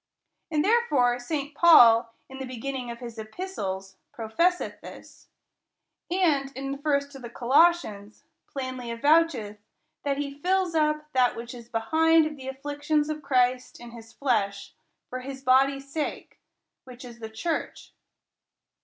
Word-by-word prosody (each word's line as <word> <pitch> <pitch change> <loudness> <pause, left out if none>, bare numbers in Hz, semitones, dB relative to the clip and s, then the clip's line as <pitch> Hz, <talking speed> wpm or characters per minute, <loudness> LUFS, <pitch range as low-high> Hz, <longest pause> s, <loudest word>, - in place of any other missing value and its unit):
And 305 0 +1
therefore 290 - +2
St. 285 +3 -4
Paul, 235 -9 +7 0.2
in 265 0 -10
the 265 - -4
beginning 255 0 -5
of 235 +1 -8
his 235 -2 -8
epistles, 200 - -6
professeth 335 +12 -1
this: - - -13 0.8
and, 315 -7 +1
in 275 0 -4
the 275 - -5
first 285 -1 0
to 270 - -11
the 240 -2 -8
Colossians, 240 -5 +1 0.2
plainly 255 -3 -5
avoucheth 255 -4 +2 0.4
that 280 -1 -1
he 280 0 -5
fills 370 +1 +1
up 305 -1 0
that 255 -1 +3
which 235 +1 -7
is 235 -1 -12
behind 320 +8 +3
of 305 -1 -4
the 265 -2 -10
afflictions 290 +3 -2
of 305 0 -5
Christ 255 -2 0
in 240 0 -11
his 225 -1 -12
flesh, 215 -7 -1 0.3
for 255 - -5
his 265 +1 -8
body's 275 +1 +3
sake, 300 +2 -5 0.4
which 255 0 -12
is 235 -1 -11
the 220 -1 -7
church. 270 +10 -4
270 Hz, 145 wpm, -26 LUFS, 235-300 Hz, 0.8 s, Paul